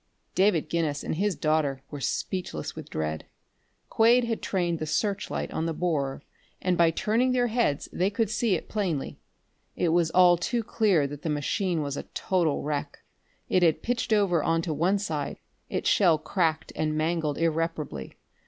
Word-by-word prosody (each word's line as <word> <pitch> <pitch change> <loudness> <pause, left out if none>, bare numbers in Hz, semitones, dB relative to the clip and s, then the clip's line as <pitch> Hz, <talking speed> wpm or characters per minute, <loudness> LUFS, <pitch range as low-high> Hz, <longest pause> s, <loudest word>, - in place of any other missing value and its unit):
David 190 -4 +3
Guinness 155 -4 -1
and - - -2
his 195 +3 0
daughter 150 -4 0
were 145 -2 -6
speechless 180 - -3
with - - -9
dread. 80 0 -3 0.6
Quade 235 +2 +4
had 230 -1 -2
trained 175 -4 -1
the 155 - -3
searchlight 200 +5 -1
on 160 - -2
the 165 - -2
borer, 145 -6 -1 0.4
and 185 -1 +1
by 170 -1 +5
turning 230 +9 +1
their 245 -1 +2
heads 225 - 0
they 185 +2 +1
could 215 +2 0
see 220 -3 +1
it - - -5
plainly. 180 -10 -2 0.6
It 175 - +1
was 165 0 +3
all 180 0 +6
too 235 +6 -1
clear 205 -9 +2
that 145 +1 -6
the 160 - -3
machine 160 +3 0
was 140 -1 -3
a - - -4
total 175 -6 0
wreck. 145 -1 -4 0.4
It 185 - +2
had 165 -3 +3
pitched 245 0 -1
over 195 -6 +3
onto 165 +1 0
one 175 +7 +2
side, 155 -8 -3 0.3
its - - -2
shell 170 -5 +4
cracked 160 0 -1
and 155 0 -1
mangled 155 -2 0
irreparably. 160 - -2
170 Hz, 170 wpm, -27 LUFS, 155-200 Hz, 0.6 s, all